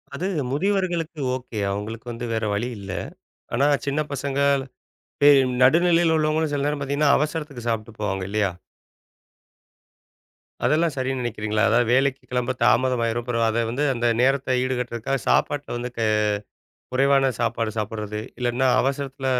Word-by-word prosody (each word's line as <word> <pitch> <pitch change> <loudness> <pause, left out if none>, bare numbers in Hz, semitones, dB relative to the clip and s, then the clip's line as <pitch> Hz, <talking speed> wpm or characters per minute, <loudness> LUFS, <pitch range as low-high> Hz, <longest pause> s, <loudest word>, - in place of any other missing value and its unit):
அது 185 - -2 0.2
முதிவர்களுக்கு 175 -1 -1 0.2
ஓகே. 125 -4 -6
அவங்களுக்கு 110 +3 -5
வந்து 120 +1 -5
வேற 110 0 -1
வழி 110 +5 -1
இல்ல. 100 -1 -7 0.6
ஆனா 135 +4 +3 0.2
சின்னப் 150 +2 -1
பசங்க, 140 0 -2 0.8
பே 145 - +8 0.3
நடு 150 +5 +6
நிலையில 165 -1 +4
உள்ளவங்களும் 155 0 +1
சில 140 -1 -1
நேரம் 145 0 -1
பாத்தீங்கன்னா 140 +1 +2
அவசரத்துக்குச் 150 -5 -3
சாப்பிட்டுப் 110 -1 -4
போவாங்க 95 -2 -1
இல்லையா? 105 -2 +1 2.2
அதெல்லாம் 160 0 +2
சரி 130 0 -1
நினைக்கிறீங்களா? 110 -3 -1
அதாவது 120 0 +3
வேலைக்குக் 135 -1 +1
கிளம்ப 125 0 0
தாமதமாயிரும். 120 -1 +2
அப்புறம் 115 -1 0
அதை 115 +1 0
வந்து 130 +6 -1
அந்த 120 -1 0
நேரத்த 130 0 +2
ஈடுகட்டுறதுக்காகச் 125 0 -2
சாப்பாட்டுல 145 -3 +1
வந்து 125 +1 -5
க 110 -2 +1 0.9
குறைவான 135 0 +4
சாப்பாடு 115 -1 0
சாப்பிடுறது. 105 0 -4 0.2
இல்லைன்னா 125 +1 +1
அவசரத்துல 135 0 -2
130 Hz, 135 wpm, -23 LUFS, 115-140 Hz, 2.2 s, பே